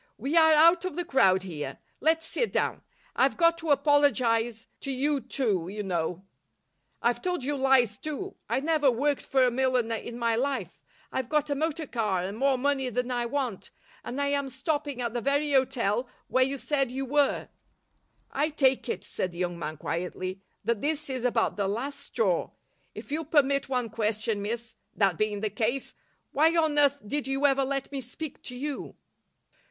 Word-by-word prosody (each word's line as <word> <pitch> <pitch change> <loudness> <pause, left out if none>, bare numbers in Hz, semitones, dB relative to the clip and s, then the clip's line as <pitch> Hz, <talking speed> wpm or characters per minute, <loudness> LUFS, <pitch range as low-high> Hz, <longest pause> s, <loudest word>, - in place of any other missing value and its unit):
"We 275 +8 -2
are 320 -1 +7
out 335 +3 +6
of 370 -5 -3
the 350 0 -2
crowd 190 - +4
here. 150 -7 -5 0.2
Let's 325 +2 +2
sit 475 - -1
down. - - 0 0.3
I've - - +2
got 335 -1 +5
to 325 -1 -5
apologise 250 -6 +3
to 275 - -6
you 280 +2 +1
too, 205 -13 -1
you 205 +2 -4
know. 180 0 -2 0.8
I've 240 0 +1
told 360 -6 -1
you 290 +2 -1
lies, 260 -6 +3
too. 310 +6 -5 0.2
I 265 - +1
never 305 -2 +3
worked 280 +4 +1
for 265 -1 +2
a 250 - +2
milliner 250 -2 +1
in 235 +1 -5
my 230 -1 +1
life. 245 - -2 0.3
I've 260 -2 -2
got 300 -1 +1
a - - +2
motor 315 +2 -1
car 210 -8 -1
and 195 +2 -4
more 270 -1 +3
money 270 0 0
than 250 +1 -2
I 240 -1 0
want, 250 -6 -3 0.3
and 255 - -5
I 280 0 +1
am 280 -1 0
stopping 285 -1 -2
at 235 -1 -2
the 240 - -2
very 285 +3 +1
hotel 255 -3 +1 0.2
where 260 - +3
you 270 +2 -1
said 275 -1 0
you 265 +2 -3
were." 285 +1 +1 0.8
"I 295 +3 +1
take 270 -4 +2
it," - - -2
said 185 - -3
the 170 - -12
young 175 -1 -2
man, 155 -1 -4
quietly, 185 +4 -4 0.2
"that 235 -3 0
this 305 -1 -1
is 255 -2 -3
about 235 -4 +1
the 200 -2 0
last 265 +8 -3
straw. 220 -10 0 0.5
If - - -9
you'll 320 +2 -1
permit 280 -2 +2
one 250 -4 -1
question, 215 -1 -1
miss, 225 +2 -4 0.2
that 195 -5 +2
being 210 -1 0
the 215 -1 -1
case, 230 +6 -1 0.4
why 320 +4 +3
on 310 -3 +3
earth 285 -1 +4
did 285 +5 -2
you 270 +1 0
ever 275 -1 +4
let 275 0 -2
me 275 -1 -3
speak 270 +4 -7
to 250 - -6
you?" 285 +2 -5
260 Hz, 190 wpm, -28 LUFS, 225-285 Hz, 0.8 s, are